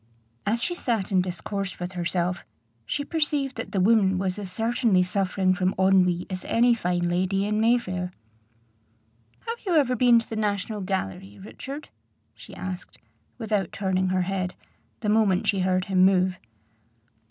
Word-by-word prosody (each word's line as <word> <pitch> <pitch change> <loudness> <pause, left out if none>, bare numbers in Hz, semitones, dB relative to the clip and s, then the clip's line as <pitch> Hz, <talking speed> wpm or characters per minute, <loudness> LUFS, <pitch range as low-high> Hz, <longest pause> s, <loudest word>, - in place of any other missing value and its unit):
As 230 +3 +1
she 350 - 0
sat 230 - -2
and 185 -2 +3
discoursed 185 +2 -4
with 180 +1 -4
herself, 175 0 -2 0.4
she 285 - -2
perceived 295 -4 0
that 225 - -5
the 195 - 0
woman 195 -1 +4
was 185 +1 -2
as 195 -3 -6
certainly 225 -2 +2
suffering 185 0 +1
from 185 0 0
ennui 185 -2 +3
as 185 -1 -5
any 240 +1 +4
fine 180 -5 0
lady 185 +3 0
in 210 +1 0
Mayfair. 185 -6 +1 1.3
"Have 460 +1 -4
you 370 -5 0
ever 265 -5 +3
been 245 0 +5
to 230 - 0
the 225 - -5
National 210 0 -2
Gallery, 105 - -4
Richard?" 275 +8 -8 0.4
she - - -13
asked, 185 -1 -7 0.4
without 210 -6 -1
turning 190 -1 0
her 185 0 +1
head, 185 -1 -2 0.5
the 215 - -3
moment 210 -4 +3
she 195 - +1
heard 185 0 +1
him 185 -2 +3
move. 185 -1 +3
195 Hz, 155 wpm, -25 LUFS, 185-225 Hz, 1.3 s, been